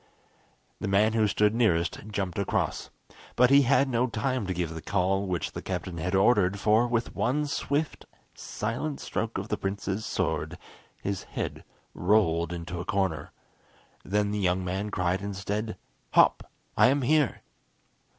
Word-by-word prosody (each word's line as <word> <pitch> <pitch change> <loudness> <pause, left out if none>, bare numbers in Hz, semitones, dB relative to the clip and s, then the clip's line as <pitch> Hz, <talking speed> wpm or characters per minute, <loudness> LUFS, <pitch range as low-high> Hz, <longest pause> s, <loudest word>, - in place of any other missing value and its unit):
The - - -3
man 105 +3 +3
who 110 -1 +3
stood 105 +1 +2
nearest 90 -8 +1
jumped 100 -4 -3
across, 100 - -1 0.5
but 125 +1 +5
he 140 0 +8
had 140 +1 +3
no 125 -1 +1
time 125 -1 -2
to 95 - -1
give 85 -2 -2
the 80 - -7
call 95 +2 0
which 90 -2 -2
the - - -6
captain 85 -3 -4
had 90 +4 -1
ordered, 100 -1 +3
for 110 +4 +3
with 120 -1 -1
one 150 +5 +1
swift, 145 +1 -2 0.3
silent 125 +7 -4
stroke 115 0 -3
of 95 +3 -5
the 105 - -1
prince's 100 +1 -3
sword, - - -2 0.5
his 100 -1 -2
head - - -5 0.3
rolled 85 -4 +2
into 85 0 -5
a - - -3
corner. 95 -4 -1 0.7
Then 105 +1 0
the 105 - -1
young 90 -1 +1
man 95 +3 -2
cried 90 -1 0
instead, 100 +2 -3 0.4
"Hop! - - +4 0.3
I - - +6
am 135 +1 +2
here." 150 +1 +2
100 Hz, 155 wpm, -27 LUFS, 95-115 Hz, 0.7 s, he